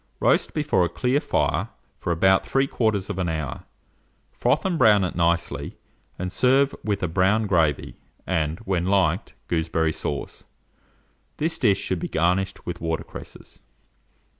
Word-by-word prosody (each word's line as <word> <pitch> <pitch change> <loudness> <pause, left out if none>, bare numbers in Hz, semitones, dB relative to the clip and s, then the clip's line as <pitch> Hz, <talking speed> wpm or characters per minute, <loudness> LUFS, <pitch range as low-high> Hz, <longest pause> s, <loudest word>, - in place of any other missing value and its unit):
Roast - - +2
before 145 -12 +2
a 85 - 0
clear 130 +3 +1
fire 145 - 0 0.3
for 90 - -2
about 95 +3 +4
3/4 105 -9 0
hour, 80 -4 -4 0.7
froth - - 0
and 185 -2 +1
brown 105 -5 +6
it 90 - -2
nicely, 85 0 -1 0.4
and 90 0 -4
serve 135 +5 +3
with 100 -3 -1
a - - +2
brown 95 +6 +2
gravy, 85 -7 +1 0.3
and, 80 -3 -1
when 95 -4 -1
liked, 95 -1 +1
gooseberry 80 -1 0
sauce. 70 -1 -5 0.9
This 160 +2 -1
dish 100 -5 +3
should 95 - -2
be - - -3
garnished 90 +4 0
with - - -5
water 80 -1 -2
cresses. - - -11
95 Hz, 140 wpm, -24 LUFS, 85-110 Hz, 0.9 s, brown